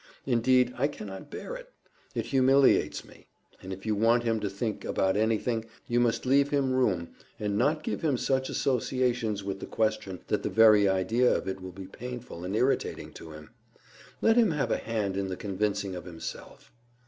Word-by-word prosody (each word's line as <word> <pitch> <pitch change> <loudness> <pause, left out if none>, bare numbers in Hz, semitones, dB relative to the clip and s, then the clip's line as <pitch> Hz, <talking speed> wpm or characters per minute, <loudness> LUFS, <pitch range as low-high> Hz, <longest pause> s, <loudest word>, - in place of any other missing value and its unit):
Indeed 125 0 +3
I 140 - +3
cannot 105 -3 -8
bear - - -6
it. - - -10 0.5
It - - -1
humiliates 135 0 +3
me. - - -18 0.3
And 95 - -8
if 95 0 -7
you 110 - +1
want 115 +3 +3
him 115 -1 +1
to 105 - -2
think 105 +2 -3
about 95 0 +1
anything, 110 +1 0 0.2
you 120 0 +1
must 120 0 +1
leave 140 +2 +4
him 140 -3 +1
room, 95 -10 +1 0.3
and 105 -1 -1
not 150 +8 +1
give - - -3
him 145 -5 +1
such 130 +1 0
associations 120 -5 0
with 95 0 -4
the - - -7
question 100 -4 -1
that - - 0
the - - -2
very 105 -2 +6
idea 110 +7 +2
of - - -1
it 95 0 -4
will 95 0 -7
be 95 +1 -9
painful 120 -3 -8
and 95 +3 -3
irritating 130 +5 0
to 80 - -10
him. 75 0 -12 0.7
Let 225 +1 +4
him 230 -4 +5
have 150 -4 -1
a - - +2
hand 105 -4 -2
in 100 -1 -1
the 95 -1 -4
convincing 100 -1 -2
of 90 -1 -7
himself. 85 -2 -9
115 Hz, 190 wpm, -28 LUFS, 95-130 Hz, 0.7 s, very